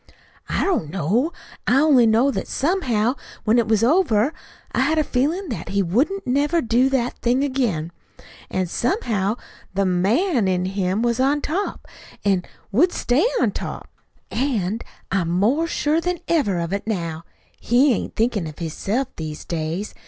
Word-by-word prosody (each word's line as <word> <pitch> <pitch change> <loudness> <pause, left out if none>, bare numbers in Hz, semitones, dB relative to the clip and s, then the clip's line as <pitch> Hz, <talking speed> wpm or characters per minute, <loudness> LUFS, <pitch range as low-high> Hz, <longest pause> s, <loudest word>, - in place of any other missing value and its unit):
"I - - 0
don't 345 - 0
know. 200 - 0 0.4
I 260 - +5
only 275 -6 +5
know 230 +5 +4
that - - -3
somehow, 260 - +1 0.3
when 225 +3 +4
it 230 - +1
was 220 -1 +2
over, 270 - +3 0.4
I - - -1
had 295 +5 +2
a 310 - +4
feelin' 300 +8 -1
that 230 - -5
he 200 0 +1
wouldn't 270 - 0
never 285 +6 +2
do 250 -1 +2
that 255 -2 -1
thing 245 +3 +2
again. 235 - -1 0.6
That 185 -1 -1
somehow 220 - 0 0.4
the 195 0 +2
MAN 210 - +2
in 180 -1 +1
him 190 +2 -1
was 235 0 +1
on 275 +3 +3
top, 370 +8 -3 0.4
an' 190 -3 +2 0.3
would 315 - +4
stay 270 - +2
on - - +2
top. - - -6 0.4
An' 225 -5 0 0.3
I'm 185 -4 +1
more 225 - +2
sure 315 0 +1
than 360 +1 -1
ever 260 - +2
of 170 +2 -2
it 200 +2 -3
now. 170 -6 -3 0.4
He 250 +3 +4
ain't - - -4
thinkin' 220 -6 0
of 155 - -9
hisself 200 - -2
these 155 -1 -6
days. 170 +4 -3
235 Hz, 160 wpm, -22 LUFS, 190-285 Hz, 0.6 s, I